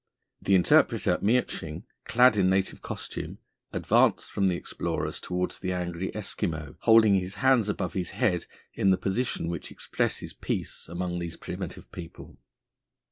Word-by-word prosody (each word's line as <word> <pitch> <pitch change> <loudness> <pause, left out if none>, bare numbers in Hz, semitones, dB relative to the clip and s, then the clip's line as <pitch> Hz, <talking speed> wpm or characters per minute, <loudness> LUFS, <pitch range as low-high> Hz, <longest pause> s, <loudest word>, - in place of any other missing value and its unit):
The 100 - +3
interpreter 90 - +4
Miertsching, 105 -8 0 0.2
clad 125 0 +5
in 95 -2 +3
native 95 0 0
costume, - - -6 0.3
advanced - - +2
from 100 - +1
the 90 - +2
explorers - - -3
towards 90 0 -3
the 95 -1 -2
angry 90 +1 -3
Eskimo, 80 -4 -3
holding 110 -2 +6
his 95 0 0
hands 130 -6 +3
above 105 - -2
his 90 -3 -1
head 95 -9 0 0.3
in 100 - +2
the 95 - +5
position 100 -3 -1
which 85 -1 -4
expresses - - -2
peace - - -4
amongst 90 0 -3
these 85 -1 -5
primitive - - -7
people. 85 -2 -10
95 Hz, 140 wpm, -28 LUFS, 85-105 Hz, 0.3 s, holding